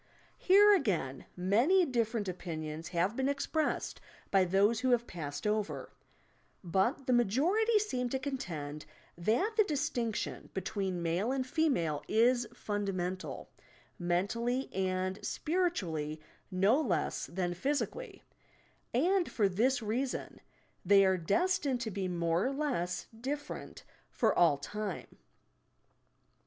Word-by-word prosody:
Here, 410 +3 +7
again, 180 - 0
many 240 - +4
different 230 -5 -1
opinions 160 -3 -5
have 185 +5 0
been 265 +2 0
expressed 285 +2 -1 0.3
by 195 -2 +5
those 200 +5 +3
who 255 +1 0
have 240 -1 +3
passed 145 -6 -6
over, 210 0 -2 0.7
but 190 +10 0
the 255 - +2
majority 325 - +3
seem 255 -13 -1
to 265 - -1
contend 165 - -5 0.3
that 230 - +1
the 430 - +7
distinc 275 - -1
tion - - -4
between 190 -2 -2
male 175 +8 0
and 265 -1 -1
female 255 - +1
is 240 +2 +3
fundamental, 195 -5 -3 0.2
— - - -30
men 175 +2 +1
tally 240 +4 -2
and 185 0 -1
spiritually 180 - -1 0.3
no 200 +9 +3
less 175 - -1
than 175 -1 -2
physically, 285 - -3 0.7
and 355 +7 +2
for 210 -3 +2
this 235 +7 +1
reason 245 +5 -3 0.4
they 200 -1 +6
are 190 0 +4
destined 275 - +1
to 225 -2 -3
be 190 -1 -2
more 170 +1 0
or - - -1
less 260 - -2 0.2
different 290 +3 -5 0.3
for - - +2
all 165 -5 +5
time. 200 +7 -6
215 Hz, 125 wpm, -32 LUFS, 180-270 Hz, 0.7 s, Here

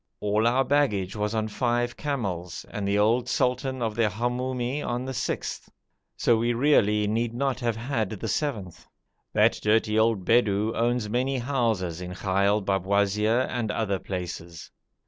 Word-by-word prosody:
All 105 +2 +1
our 130 +3 +3
baggage 120 -10 +1
was 105 +1 -2
on 110 0 0
five 120 +2 -1
camels 95 - -4
and 105 -4 -3
the 100 +1 +1
old 115 +4 +2
sultan 130 +1 0
of 110 -2 -1
the 110 -1 +2
Hamoumi 125 +5 -2
on 120 -1 -3
the 130 - -4
sixth, - - -3 0.5
so 120 - +3
we 120 +2 +1
really 110 -5 +3
need 115 +2 -1
not 135 0 -1
have 120 -3 -1
had 115 -3 -2
the 110 +2 -5
seventh. 105 - -3 0.5
That - - +3
dirty 110 0 +2
old 110 -4 +2
Bedou 110 -2 +2
owns 120 -1 0
many 130 +5 0
houses 115 - -1
in 90 0 -6
Ghail 100 +2 +1
Babwazir 100 +4 +2
and 115 -3 -2
other 105 -3 -1
places. 85 -3 -6
110 Hz, 155 wpm, -26 LUFS, 100-125 Hz, 0.5 s, our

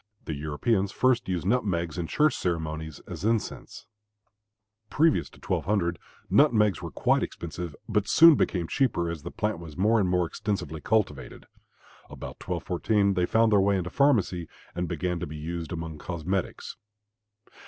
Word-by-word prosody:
The 80 - -3
Europeans 95 +8 0
first 125 0 +1
used 90 -2 -2
nutmegs 95 -7 0
in 85 - -2
church 150 - +3
ceremonies 80 -3 -3
as 85 -1 -8
incense. 110 0 -2 1.0
Previous 160 +1 +2
to - - -18
1200 90 -5 -1 0.3
nutmegs 105 - +4
were - - -5
quite - - +1
expensive, 85 -1 -5
but 105 -2 0
soon 165 0 +8
became 90 - 0
cheaper 85 -11 0
as 80 -3 -6
the 85 - -6
plant 105 -3 -2
was 80 -2 -10
more 110 +4 +3
and 95 -3 +1
more 90 -1 +2
extensively 85 -5 -4
cultivated. 95 -11 -1 0.6
About - - -9
1214 100 +3 0
they 90 -2 +1
found 115 0 +3
their 100 -2 +5
way 100 0 +3
into 90 -1 -3
pharmacy 105 - +2 0.3
and 90 0 -2
began 85 +1 -2
to 85 - -4
be 75 - -7
used 85 +2 -5
among 80 -2 -5
cosmetics. 90 +3 -3
90 Hz, 155 wpm, -27 LUFS, 85-105 Hz, 1.0 s, soon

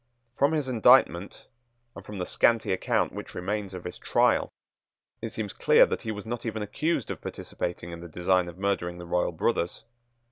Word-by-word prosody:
From 140 +3 +3
his 150 -4 0
indictment, 120 -6 +4 0.5
and - - -9
from 105 - -8
the 90 - -2
scanty 115 +2 +2
account 95 - 0
which - - -8
remains 100 +1 -3
of 90 - -7
his 90 - -7
trial, - - +2 0.7
it 115 - -3
seems 105 -2 -4
clear - - +6
that - - -3
he 110 - -3
was 105 -1 -6
not 120 +1 -4
even 110 -2 -3
accused 150 +11 -1
of - - -6
participating 85 0 -5
in 85 - -7
the 85 - -8
design 90 +2 +1
of 85 0 -9
murdering 95 -3 -1
the 90 - -8
royal 90 +1 0
brothers. 85 +3 -1
100 Hz, 185 wpm, -27 LUFS, 90-115 Hz, 0.7 s, clear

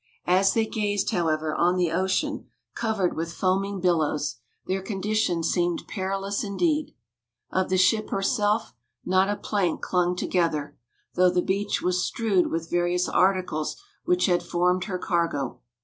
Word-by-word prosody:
As 190 +2 +3
they 225 -1 +3
gazed, 205 -3 -1
however, 160 -5 0
on 175 +1 +2
the 175 -3 +1
ocean, 190 +2 -1 0.3
covered 220 -6 -1
with 165 +1 -3
foaming 195 +2 0
billows, 155 -6 0 0.3
their 190 +1 -1
condition 195 -3 -1
seemed 175 0 0
perilous 195 0 -2
indeed. 300 - 0 0.6
Of 185 0 0
the 185 - +2
ship 215 +4 +3
herself, 205 +2 0 0.3
not 185 +2 +3
a 205 - +1
plank 195 -5 -1
clung 180 -1 +1
together, 155 -5 -1 0.4
though 180 0 +4
the 180 0 +1
beach 200 +2 -1
was 180 0 +1
strewed 210 -6 +1
with 165 0 -3
various 175 +1 +1
articles 185 - +1 0.2
which 360 +1 +2
had 175 -2 +2
formed 180 +1 +1
her 190 -3 -3
cargo. 165 -9 -1
185 Hz, 145 wpm, -25 LUFS, 175-200 Hz, 0.6 s, though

